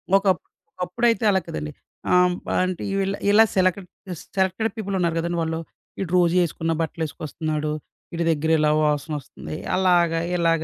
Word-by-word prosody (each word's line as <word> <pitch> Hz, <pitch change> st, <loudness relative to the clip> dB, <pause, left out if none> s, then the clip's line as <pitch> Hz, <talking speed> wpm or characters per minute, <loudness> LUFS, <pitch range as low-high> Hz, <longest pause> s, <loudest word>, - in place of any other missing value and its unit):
ఒకప్పు 195 Hz, -1 st, +2 dB, 0.3 s
ఒకప్పుడైతే 230 Hz, +6 st, 0 dB
అలా 190 Hz, -, +3 dB
కాదండి. 75 Hz, -1 st, -5 dB, 0.4 s
ఆహ్, 180 Hz, 0 st, +5 dB, 0.3 s
అంటే 185 Hz, -1 st, -3 dB
ఇలా 195 Hz, 0 st, 0 dB
ఇలా 215 Hz, +2 st, +7 dB
సెలెక్డ్ 185 Hz, 0 st, +1 dB, 0.5 s
సెలెక్టెడ్ 190 Hz, +4 st, +1 dB
పీపులున్నారు 190 Hz, -5 st, -1 dB
కదండి! 170 Hz, +1 st, -2 dB
వాళ్ళు 160 Hz, 0 st, -2 dB, 0.4 s
వీడు 185 Hz, -3 st, -4 dB
రోజేసుకున్న 170 Hz, -2 st, +2 dB
బట్టలేసుకొస్తున్నాడు. 155 Hz, -1 st, -3 dB, 0.4 s
ఈడి 170 Hz, 0 st, -1 dB
దెగ్గర 160 Hz, +1 st, 0 dB
ఇలా 150 Hz, 0 st, +3 dB
వాసన 150 Hz, +1 st, 0 dB
వస్తుంది. 150 Hz, +2 st, -8 dB, 0.2 s
అలాగా, 175 Hz, -3 st, +3 dB, 0.2 s
ఇలాగ 165 Hz, -2 st, +2 dB
175 Hz, 130 wpm, -23 LUFS, 160-190 Hz, 0.5 s, ఇలా